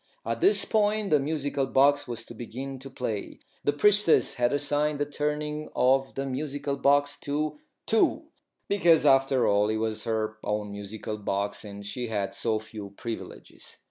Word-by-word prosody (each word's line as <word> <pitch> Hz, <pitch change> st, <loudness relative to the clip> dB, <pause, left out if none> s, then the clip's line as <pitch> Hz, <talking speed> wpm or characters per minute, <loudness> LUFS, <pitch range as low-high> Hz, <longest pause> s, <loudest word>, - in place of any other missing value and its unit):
At -, -, -2 dB
this 395 Hz, +4 st, +5 dB
point 210 Hz, -2 st, +1 dB
the 150 Hz, -, +5 dB
musical 140 Hz, -1 st, -1 dB
box 145 Hz, +2 st, +3 dB
was 120 Hz, -1 st, -5 dB
to -, -, -10 dB
begin 130 Hz, +4 st, -7 dB
to 135 Hz, +1 st, -9 dB
play. 115 Hz, -6 st, -4 dB, 0.2 s
The -, -, +3 dB
Priestess 205 Hz, +4 st, +4 dB
had 120 Hz, -2 st, +1 dB
assigned 145 Hz, +1 st, +1 dB
the 145 Hz, -, 0 dB
turning 150 Hz, +1 st, -3 dB
of 135 Hz, +1 st, +2 dB
the 135 Hz, -, -2 dB
musical 140 Hz, +1 st, -3 dB
box 145 Hz, +1 st, +2 dB
to 150 Hz, +1 st, -2 dB, 0.3 s
Two, 225 Hz, -, +2 dB, 0.4 s
because, 170 Hz, -6 st, +4 dB
after 135 Hz, -2 st, +4 dB
all, 105 Hz, +1 st, +3 dB
it 110 Hz, -, 0 dB
was 110 Hz, 0 st, -2 dB
her 110 Hz, -1 st, -2 dB
own 105 Hz, 0 st, -2 dB
musical 105 Hz, +1 st, -6 dB
box, 100 Hz, 0 st, -2 dB
and 100 Hz, -1 st, -9 dB
she 120 Hz, +4 st, -4 dB
had 100 Hz, -3 st, -2 dB
so 110 Hz, +2 st, 0 dB
few 105 Hz, -2 st, -9 dB
privileges. 115 Hz, -1 st, -8 dB
135 Hz, 165 wpm, -27 LUFS, 110-145 Hz, 0.4 s, this